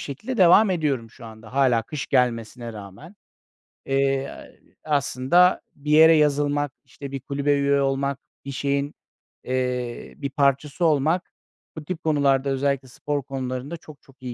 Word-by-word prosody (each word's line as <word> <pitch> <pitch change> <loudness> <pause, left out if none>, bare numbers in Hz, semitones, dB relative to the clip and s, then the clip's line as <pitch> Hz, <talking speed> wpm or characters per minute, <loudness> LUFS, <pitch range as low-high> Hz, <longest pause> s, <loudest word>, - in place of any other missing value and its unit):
şekilde 215 - -5
devam 190 +2 +6
ediyorum 140 -10 -1
şu 120 - -14
anda 110 0 -12
hâlâ 130 -4 +3
kış 150 +1 -6
gelmesine 120 -2 -1
rağmen. 100 - -11 0.7
Eee, 135 0 -1 0.3
aslında 150 +4 +2
bir 150 +1 -5
yere 160 +2 +7
yazılmak, 145 -1 +1
işte, 140 -1 -10
bir 135 - -4
kulübe 140 +1 0
üye 140 0 +2
olmak, 135 0 -1 0.3
bir 140 - -5
şeyin, 140 +2 -1 0.5
eee, 125 -1 -3
bir 140 - -4
parçası 140 +4 +1
olmak 160 +3 +1 0.5
bu 155 - -6
tip 170 -1 -5
konularda 140 -3 +2
özellikle 135 0 -1
spor 145 +3 -4
konularında 130 +3 -5
çok 155 -2 -15
çok 135 -1 -23
iyi 125 -1 -5
140 Hz, 140 wpm, -23 LUFS, 130-150 Hz, 0.7 s, yere